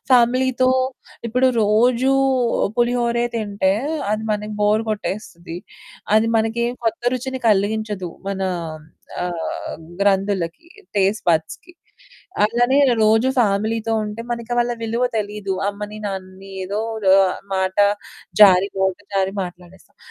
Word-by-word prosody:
ఫ్యామిలీతో, 255 +1 +4 0.6
ఇప్పుడు 250 +3 +2
రోజూ 235 +5 +3 0.7
పులిహోరే 240 0 +1
తింటే 205 -4 0 0.4
అది 215 0 -1
మనకి 210 0 -2
బోర్ 210 +1 +3
కొట్టేస్తది, 195 -5 -5 0.6
అది 220 +1 +4
మనకేం 230 +2 0
కొత్త 225 0 -1
రుచిని 260 +1 -4
కలిగించదు 210 -2 0 0.2
మన 195 -1 -3 0.8
ఆహ్, 175 -2 -4 0.2
గ్రంధులకి 195 - 0 0.3
టేస్ట్ 200 +2 +1
బడ్స్‌కి. 165 - -2 0.7
అలానే 245 +4 +2 0.3
రోజు 220 +3 +4
ఫ్యామిలీ‌తో 220 +1 +1
ఉంటే 210 +2 -6
మన 235 0 -1 0.2
వాళ్ళ 240 0 +1
విలువ 230 +2 0
తెలీదు. 205 -2 -3
అమ్మని 210 +1 -6
నాన్నని 190 0 -7
ఏదో 200 +3 -3 0.4
ఆహ్, 185 - -2 0.2
మాట 190 0 -1 0.7
జారి 190 -1 +7
నోట 190 -1 +1 0.2
జారి 195 0 0
మాట్లాడేస్తాం. 180 0 -11
210 Hz, 105 wpm, -21 LUFS, 195-235 Hz, 0.8 s, జారి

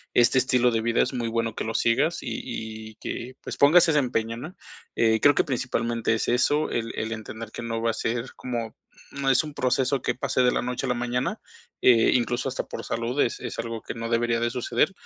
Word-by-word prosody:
este 120 +2 +5
estilo 125 -1 +3
de 115 -1 0
vida, 115 +1 +2
es - - -3
muy 120 -2 -2
bueno 115 -1 -1
que - - -3
lo 115 - -3
sigas 145 +9 +2
y 110 -2 -6
y - - -33
que 125 +3 -6
pues - - -6
pongas 165 +5 +6
ese 150 -2 +4
empeño, 115 -3 -1
¿no?, 155 +9 -8 0.4
eh, 110 -1 +3
creo 145 -1 +6
que - - +3
principalmente 115 -3 -1
es 110 - -1
eso, 145 +5 +2
el 115 -1 -2
el 110 +1 -2
entender 110 0 -7
que - - -7
no 115 -1 -3
va 115 - +2
a - - -6
ser 115 +3 -2
como, 120 -3 -4 0.4
mm, 140 - -7
no 135 - +2
es 135 - +4
un 150 -1 -7
proceso 130 +1 +1
que 125 - -1
pase 130 0 0
de 125 -1 +4
la - - 0
noche 125 +2 -3
a 130 - -2
la 125 - +1
mañana, 120 +1 -2 0.4
eh, 115 -3 +5
incluso 120 +1 0
hasta 130 - -3
por - - -7
salud, 120 +4 -2
es 115 - 0
es 120 -2 -5
algo 115 -1 -4
que - - -5
no 115 0 -5
debería 115 0 +1
de 120 0 +1
suceder, 125 +9 0
120 Hz, 235 wpm, -25 LUFS, 115-130 Hz, 0.4 s, pongas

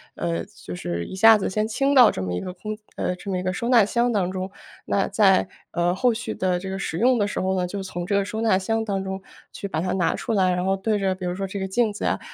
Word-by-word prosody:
呃， 85 -1 -2
就 90 - -10
是 85 -1 -3
一 - - -7
下 225 +3 +8
子 195 - -2
先 215 +2 0
清 275 +5 +1
到 250 -4 +8
这 - - -5
么 95 -1 -3
一 90 - -1
个 180 - -6
空 215 +4 -6 0.2
呃， 180 - -1
这 190 +2 -9
么 185 - 0
一 - - -3
个 185 - 0
收 210 +6 -3
纳 240 -4 +6
箱 235 +4 +1
当 195 -5 +1
中。 185 0 -4 0.4
那 195 - +1
在， 195 -3 +4 0.2
呃， 175 0 +1
后 245 +5 +2
续 240 +3 -4
的 180 -1 0
这 190 +1 -6
个 190 - -3
使 180 -4 -3
用 250 +3 +4
的 205 -2 +1
时 - - -3
候 190 0 0
呢， 180 - +1
就 195 +3 -4
从 175 -2 -5
这 190 - -2
个 200 - +3
收 220 +3 -4
纳 220 -4 +3
箱 225 +3 -1
当 195 -2 -2
中 190 0 -4 0.3
去 200 - -6
把 160 -5 -2
它 185 +1 -1
拿 185 -3 +1
出 230 - -3
来， 190 -3 +3
然 180 0 -1
后 195 +1 +1
对 210 +2 0
着 190 -1 0
比 185 -1 -6
如 175 - -1
说 195 +1 -3
这 195 +1 -5
个 190 - -2
镜 220 +3 +1
子 205 - -5
啊， - - +1
190 Hz, 315 characters per minute, -24 LUFS, 185-215 Hz, 0.4 s, 下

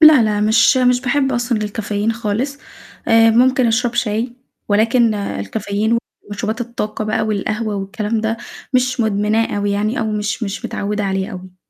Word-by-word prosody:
لا، 310 -5 +8
لا، 210 -1 +1
مش 225 +5 +4
مش 250 -1 +3
باحب 270 +1 +1
أصلًا 240 -2 0
الكافيين 210 +1 -2
خالص. 235 +6 -2 0.5
آآ، 225 0 +6
ممكن 255 +2 +4
أشرب 235 +1 +1
شاي 230 +1 -1 0.4
ولكن 225 +2 +3
الكافيين 205 - -1 0.3
ومشروبات 215 +3 -3
الطاقة 220 -2 -3
بقى 215 +1 0
والقهوة 215 +1 -2
والكلام 210 +3 -2
ده، 220 +1 -1 0.4
مش 255 0 +1
مدمناه 215 0 +1
أوي 205 0 0
يعني 210 +5 0
أو 220 - -1
مش 210 +2 -2
مش 200 -2 -4
متعوّدة 205 0 -2
عليه 190 +1 -1
أوي. 185 0 -10
220 Hz, 155 wpm, -18 LUFS, 205-240 Hz, 0.5 s, لا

